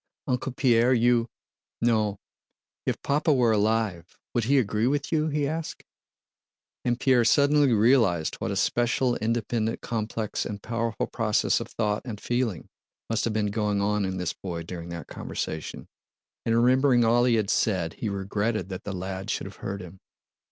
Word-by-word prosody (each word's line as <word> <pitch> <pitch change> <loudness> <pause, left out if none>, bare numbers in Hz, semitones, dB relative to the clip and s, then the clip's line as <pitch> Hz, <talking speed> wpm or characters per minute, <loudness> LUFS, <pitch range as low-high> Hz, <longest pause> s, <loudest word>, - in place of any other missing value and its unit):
"Uncle 125 +1 -1
Pierre, 125 -1 +3
you... 120 0 +3 0.5
no... 110 -3 +1 0.7
If - - 0
Papa 150 +3 +2
were 125 -5 +4
alive... 105 -5 0 0.2
would 120 -2 +1
he 140 +4 +3
agree 110 -2 +1
with 140 +1 -1
you?" 155 -1 +2
he 150 -2 0
asked. 160 +2 -4 1.0
And 120 0 0
Pierre 130 -3 +4
suddenly 145 +2 +4
realized 110 -7 +3
what - - -3
a - - -2
special, 120 +1 +1
independent, 115 0 -1
complex, 110 -1 -3
and 100 - -5
powerful 115 -1 -2
process 110 -3 +1
of - - -5
thought 105 -2 -1
and 110 -5 -6
feeling 120 -8 -2 0.4
must 115 - 0
have 115 - -1
been 105 -1 0
going 105 -1 0
on 105 +1 +1
in 95 -1 -2
this 90 -2 -2
boy 85 -3 -6
during 85 0 -7
that 85 -1 -6
conversation, 80 -1 -5 0.6
and 115 - +3
remembering 125 0 +4
all 120 +2 +4
he 120 -2 +3
had 105 -3 +1
said 90 -6 +1
he 110 - -4
regretted 100 0 -2
that 95 -1 -6
the 100 - -4
lad 95 +2 -5
should - - -2
have 100 - -10
heard 100 0 -5
him. 90 +1 -12
115 Hz, 165 wpm, -26 LUFS, 100-120 Hz, 1.0 s, were